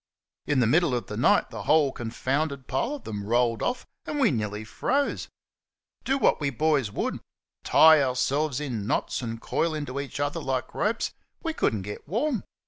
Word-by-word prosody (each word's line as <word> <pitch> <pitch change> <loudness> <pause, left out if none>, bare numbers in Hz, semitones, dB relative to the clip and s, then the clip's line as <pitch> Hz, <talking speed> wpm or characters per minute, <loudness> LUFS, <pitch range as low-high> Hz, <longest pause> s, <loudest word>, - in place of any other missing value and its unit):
In 140 -3 +2
the - - +4
middle 150 +3 +3
of 120 -4 -2
the - - -6
night, - - +3
the - - -6
whole 150 -3 +4
confounded 130 +4 -2
pile 235 - -1
of 285 - -11
them 105 -2 -5
rolled 115 +1 +1
off, 245 0 -1 0.2
and 300 - -2
we 250 - +4
nearly 105 -3 -2
froze. 275 - -1 0.7
Do 270 - +1
what 265 - +2
we 140 - +1
boys 140 -3 +1
would - - -2 0.4
tie 160 -1 +7
ourselves 135 +2 0
in 120 -9 -3
knots - - -1
and 115 -2 -4
coil 160 +6 -1
into 140 -3 -4
each 140 -1 -5
other 145 0 -1
like 130 -1 -2
ropes 225 +2 -1 0.3
we 325 -2 -1
could 115 - +1
n't 100 - -4
get 105 +2 -8
warm. 230 - 0
140 Hz, 185 wpm, -26 LUFS, 120-160 Hz, 0.7 s, tie